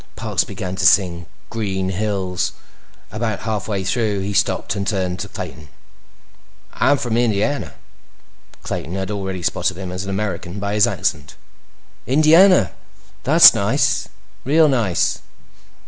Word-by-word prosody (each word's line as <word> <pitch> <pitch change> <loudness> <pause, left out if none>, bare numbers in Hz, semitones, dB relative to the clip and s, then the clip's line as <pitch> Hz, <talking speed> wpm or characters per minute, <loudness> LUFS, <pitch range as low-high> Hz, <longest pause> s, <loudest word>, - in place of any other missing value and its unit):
Parks - - -1
began 95 0 -6
to - - -1
sing 85 -3 +2 0.2
Green 95 -4 -2
Hills. 95 -2 -2 0.6
About 110 -1 -3
halfway 105 -2 -3
through, 105 0 -1
he 100 +1 -3
stopped - - 0
and 100 -1 -3
turned 95 -3 -2
to - - -4
Clayton. 75 -1 -8 1.1
"I'm 145 - +2
from 120 -4 -2
Indiana." 115 - 0 0.9
Clayton 85 - -5
had 95 +1 -3
already 95 -3 -4
spotted 85 - -1
him 95 -2 -6
as 90 +1 -4
an 100 - -6
American 95 -2 -4
by 100 0 -3
his 105 -1 +4
accent. - - -3 0.7
"Indiana? 155 - +5 0.5
That's - - +8
nice. - - 0 0.3
Real 155 +4 +4
nice." 115 - 0
100 Hz, 130 wpm, -19 LUFS, 95-110 Hz, 1.1 s, That's